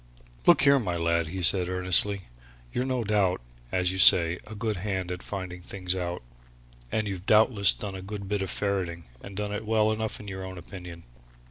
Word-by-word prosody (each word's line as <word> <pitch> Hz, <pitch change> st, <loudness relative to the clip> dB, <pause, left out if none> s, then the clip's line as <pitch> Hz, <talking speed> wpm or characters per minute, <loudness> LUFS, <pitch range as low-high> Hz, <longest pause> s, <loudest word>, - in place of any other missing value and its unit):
"Look -, -, +6 dB
here, 140 Hz, -1 st, +6 dB
my 90 Hz, -8 st, -2 dB
lad!" 85 Hz, 0 st, +1 dB
he 90 Hz, +3 st, -5 dB
said, 90 Hz, +1 st, +3 dB
earnestly. 95 Hz, +2 st, +3 dB, 0.5 s
"You're 125 Hz, -, -1 dB
no 130 Hz, -2 st, -1 dB
doubt, 100 Hz, -4 st, +1 dB, 0.3 s
as 90 Hz, -1 st, +1 dB
you 95 Hz, -, -4 dB
say, 85 Hz, -2 st, +6 dB
a 110 Hz, -, -8 dB
good 110 Hz, -1 st, -2 dB
hand 95 Hz, -2 st, -3 dB
at 90 Hz, 0 st, -5 dB
finding 90 Hz, -3 st, -6 dB
things 95 Hz, 0 st, -3 dB
out, 90 Hz, -5 st, -4 dB, 0.7 s
and 110 Hz, -1 st, -1 dB
you've 95 Hz, -1 st, -6 dB
doubtless 105 Hz, -2 st, +5 dB
done 100 Hz, -2 st, -6 dB
a 95 Hz, -, -7 dB
good 100 Hz, +1 st, -7 dB
bit 105 Hz, 0 st, -1 dB
of 95 Hz, -, -3 dB
ferreting, 95 Hz, -4 st, -2 dB, 0.2 s
and 100 Hz, -1 st, -10 dB
done 105 Hz, 0 st, -3 dB
it 105 Hz, -, -4 dB
well 110 Hz, 0 st, +2 dB
enough 110 Hz, 0 st, -3 dB
in 105 Hz, -, -10 dB
your 95 Hz, -1 st, -6 dB
own 95 Hz, 0 st, -7 dB
opinion. 90 Hz, -1 st, -10 dB
95 Hz, 200 wpm, -27 LUFS, 90-105 Hz, 0.7 s, Look